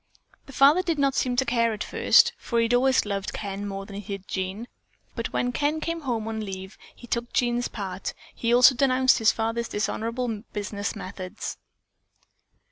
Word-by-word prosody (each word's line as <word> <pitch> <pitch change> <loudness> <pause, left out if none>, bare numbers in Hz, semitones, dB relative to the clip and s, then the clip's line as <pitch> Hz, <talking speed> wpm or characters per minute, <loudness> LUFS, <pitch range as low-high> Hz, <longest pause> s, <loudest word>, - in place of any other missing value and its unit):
"The 275 - -11
father 285 +7 +6
did 340 -4 -1
not 275 -1 +2
seem 250 -2 0
to 265 +2 +2
care 230 -2 +2
at 210 - -4
first, - - +4
for 235 - -2
he 230 - +4
had 235 - 0
always 260 0 +3
loved 200 -2 -3
Ken 200 0 -4
more 195 0 -5
than 200 0 -9
he 200 0 -5
did 195 - -24
Jean, 190 +5 -4 0.5
but - - -3
when 245 - 0
Ken 295 +4 0
came 335 +1 -3
home 235 -6 -2
on 220 -1 -3
a - - -4
leave 190 -1 -7 0.2
he - - -13
took 235 0 -3
Jean's 245 0 +1
part, 190 -2 -5 0.3
and 230 - +1
also 250 +2 +7
denounced 260 0 +3
his 225 -1 +5
father's 230 +1 -2
dishonorable 225 +1 -2
business 205 0 -3
methods." 185 -2 -6
230 Hz, 190 wpm, -26 LUFS, 205-255 Hz, 0.5 s, also